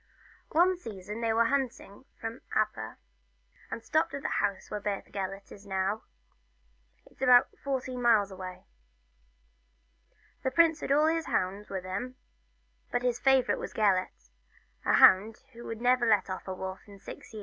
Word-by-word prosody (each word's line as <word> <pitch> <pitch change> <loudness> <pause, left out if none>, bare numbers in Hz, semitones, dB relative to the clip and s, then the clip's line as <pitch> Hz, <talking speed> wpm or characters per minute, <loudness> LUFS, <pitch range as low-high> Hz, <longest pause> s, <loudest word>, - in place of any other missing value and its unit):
One 355 +3 +3
season 210 - -7
they 230 -1 +1
went 230 +1 +3
hunting 265 -4 -3
from 225 +2 -6
Aber, - - -1 0.7
and 230 - -6
stopped 315 +5 +1
at 280 - -6
the - - 0
house 195 -2 -2
where 210 - -2
Beth 205 -1 -4
Gelert 195 0 -5
is 205 0 -13
now 195 +3 -1 1.0
it - - -22
's - - -21
about 250 -1 +5
fourteen 260 -2 -3
miles 220 -4 +4
away. 185 -1 -8 1.8
The 260 - 0
prince 325 +3 +4
had - - -4
all 295 +2 +5
his 325 0 +1
hounds 195 +3 -1
with 190 -2 -4
him, 200 +8 -4 0.8
but 245 - 0
his 245 -1 0
favourite 265 -2 +3
was - - -6
Gelert, 185 - 0 0.5
a - - +3
hound 210 +4 +6
who 235 +1 -9
had 225 -1 -5
never 245 0 +3
let 205 -3 +3
off 185 - -6
a 190 - -3
wolf 190 0 -5
for 200 -1 -14
six 195 - -11
years. 220 - -8
225 Hz, 165 wpm, -29 LUFS, 195-255 Hz, 1.8 s, hound